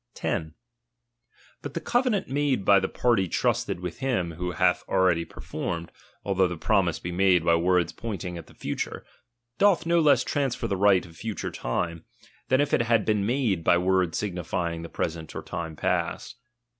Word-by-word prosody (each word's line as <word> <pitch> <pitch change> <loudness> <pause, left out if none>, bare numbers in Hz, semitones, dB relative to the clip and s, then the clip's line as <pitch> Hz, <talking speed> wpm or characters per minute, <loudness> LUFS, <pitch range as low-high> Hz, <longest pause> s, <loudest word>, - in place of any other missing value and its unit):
■' - - -56
10. 80 0 -3 1.1
But - - -7
the - - 0
covenant 245 -4 +1
made 135 -6 0
by 100 0 +6
the 95 - -1
party 115 -6 +1
trusted - - 0
s 90 - -13
with 90 -1 -5
him 120 -11 -1
who 90 +2 -4
hath - - +2
already 90 -3 +2
performed, 85 0 -5 0.3
although 95 -2 +2
the 85 -1 -5
promise 90 -2 +1
be 85 - -6
made 90 -2 +3
by 85 - +4
words 90 0 +2
pointing 95 -6 -5
at 85 -2 -8
the - - -18
fu - - -4
ture, - - -5 0.5
doth 195 -5 +4
no 170 0 +3
less 150 -3 +4
transfer 135 -5 -1
the 100 - 0
right 95 -1 +4
of 85 -1 -15
future 110 +2 -4
time, 85 +6 -3 0.4
than 130 - +3
if 145 - +1
it - - +4
had 115 -2 +2
been 105 -2 +1
made 115 -9 0
by 85 - +4
words 90 -1 +1
signifying 90 -3 -3
the 85 - -8
present 80 -1 -4
or - - -5
time 85 -3 -5
past. - - -2
95 Hz, 185 wpm, -26 LUFS, 85-115 Hz, 1.1 s, by